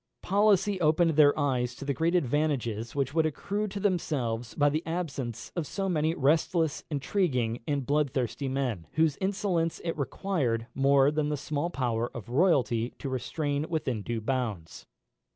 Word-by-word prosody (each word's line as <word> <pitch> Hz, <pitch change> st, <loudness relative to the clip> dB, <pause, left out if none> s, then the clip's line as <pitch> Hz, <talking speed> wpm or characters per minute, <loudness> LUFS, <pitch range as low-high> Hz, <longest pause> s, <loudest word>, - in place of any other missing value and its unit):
Policy 200 Hz, -1 st, +3 dB
opened 160 Hz, +2 st, +4 dB
their 145 Hz, -2 st, +5 dB
eyes 125 Hz, -3 st, 0 dB
to 140 Hz, -, -8 dB
the 140 Hz, -, 0 dB
great 165 Hz, +4 st, +1 dB
advantages 130 Hz, -7 st, 0 dB
which 135 Hz, -1 st, -1 dB
would 160 Hz, -1 st, +3 dB
accrue 200 Hz, +7 st, -2 dB
to 200 Hz, 0 st, -5 dB
themselves 130 Hz, -, -1 dB
by 145 Hz, -, +3 dB
the 150 Hz, +2 st, +1 dB
absence 145 Hz, -9 st, -4 dB
of 170 Hz, -5 st, -2 dB
so 195 Hz, -1 st, -2 dB
many 160 Hz, -2 st, +1 dB
restless, 160 Hz, +2 st, +1 dB
intriguing, 135 Hz, -, 0 dB
and 140 Hz, -3 st, -1 dB
bloodthirsty 140 Hz, -3 st, 0 dB
men, 125 Hz, -11 st, -2 dB
whose 160 Hz, -2 st, +2 dB
insolence 190 Hz, -4 st, 0 dB
it 165 Hz, -, -2 dB
required 140 Hz, -, -1 dB
more 135 Hz, +1 st, +4 dB
than 150 Hz, -1 st, 0 dB
the 150 Hz, -, -1 dB
small 150 Hz, +3 st, -2 dB
power 120 Hz, -5 st, -1 dB
of 120 Hz, 0 st, -9 dB
royalty 125 Hz, -6 st, +2 dB
to 140 Hz, -, -5 dB
restrain 145 Hz, +3 st, -2 dB
within 135 Hz, -9 st, -1 dB
due 115 Hz, +2 st, -3 dB
bounds. 110 Hz, -9 st, -3 dB
145 Hz, 155 wpm, -28 LUFS, 125-165 Hz, -, their